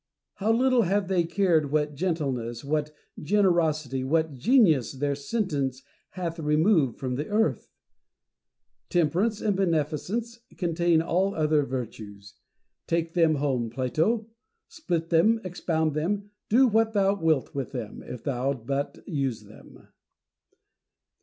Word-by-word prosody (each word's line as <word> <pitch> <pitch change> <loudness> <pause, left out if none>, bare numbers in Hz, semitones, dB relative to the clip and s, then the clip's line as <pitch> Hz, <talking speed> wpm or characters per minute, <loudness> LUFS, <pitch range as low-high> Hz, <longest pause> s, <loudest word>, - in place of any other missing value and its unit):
how 210 +3 +1
little 255 +1 +3
have 200 -1 +1
they 180 -3 +2
cared 165 -5 +1
what 150 0 0
gentleness, 135 -8 -2
what 150 +1 -1 0.3
generosity, 155 -8 +1
what 160 +2 +1
genius, 155 - +3
their 140 +1 -1
sentence 140 - -2 0.3
hath 170 -2 -3
removed 155 - +2
from 125 -2 -3
the 150 - -3
earth! 220 +2 0 1.2
Temperance 180 +6 +1
and 205 -2 +1
beneficence 185 +7 -1 0.2
contain 170 -2 +2
all 190 +4 0
other 155 -1 +2
virtues. 110 -6 -7 0.5
Take 165 0 -1
them 165 -3 +3
home, 135 -5 -1
Plato; 155 - 0 0.4
split 170 - -3
them, 215 +8 +4
expound 160 -4 -1
them; 200 +7 -2 0.2
do 255 +4 +5
what 225 0 +2
thou 200 -1 +3
wilt 160 -8 0
with 135 -3 -4
them, 115 -5 -6
if 125 - -9
thou 135 -1 -1
but 135 +4 -4
use 135 - -2
them. 105 +1 -16
160 Hz, 125 wpm, -26 LUFS, 140-195 Hz, 1.2 s, do